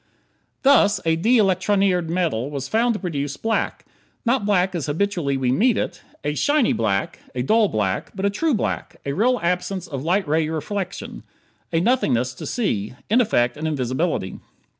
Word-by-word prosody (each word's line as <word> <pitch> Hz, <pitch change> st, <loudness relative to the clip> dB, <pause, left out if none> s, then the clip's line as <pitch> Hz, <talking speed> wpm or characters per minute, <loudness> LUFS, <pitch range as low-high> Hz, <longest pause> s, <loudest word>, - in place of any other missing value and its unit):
Thus, 210 Hz, -8 st, +5 dB
a 165 Hz, 0 st, +3 dB
de 225 Hz, +10 st, +3 dB
electronired 190 Hz, -3 st, +2 dB
metal 165 Hz, -8 st, 0 dB
was 140 Hz, -2 st, -4 dB
found 230 Hz, -, +2 dB
to -, -, -3 dB
produce 145 Hz, -6 st, -3 dB
black. 225 Hz, +5 st, -1 dB, 0.4 s
Not 235 Hz, -3 st, +1 dB
black 190 Hz, -2 st, +2 dB
as 165 Hz, -5 st, -3 dB
habitually 160 Hz, -3 st, 0 dB
we 130 Hz, -2 st, +1 dB
meet 220 Hz, -, +3 dB
it 180 Hz, -, -3 dB, 0.2 s
a 145 Hz, +1 st, -1 dB
"shiny" 290 Hz, -, +2 dB
black, 100 Hz, -4 st, -1 dB, 0.2 s
a 125 Hz, -, -1 dB
"dull" 220 Hz, -, +4 dB
black; 100 Hz, -, -1 dB
but 195 Hz, +1 st, -2 dB
a 200 Hz, -, +2 dB
true 310 Hz, +6 st, +1 dB
black -, -, -3 dB
a 140 Hz, -, -1 dB
real 245 Hz, -, +2 dB
absence 180 Hz, +1 st, -1 dB
of 140 Hz, -6 st, -5 dB
light 180 Hz, +2 st, +1 dB
ray 155 Hz, +1 st, +1 dB
reflection 200 Hz, +7 st, -4 dB, 0.5 s
a 165 Hz, -, +2 dB
"nothingness 145 Hz, -, +1 dB
to -, -, -8 dB
see"; 110 Hz, -, -2 dB, 0.2 s
in 240 Hz, +3 st, +5 dB
effect, 120 Hz, -, +1 dB
an 155 Hz, +1 st, -3 dB
invisibility. 130 Hz, -, -1 dB
180 Hz, 170 wpm, -22 LUFS, 140-210 Hz, 0.5 s, Thus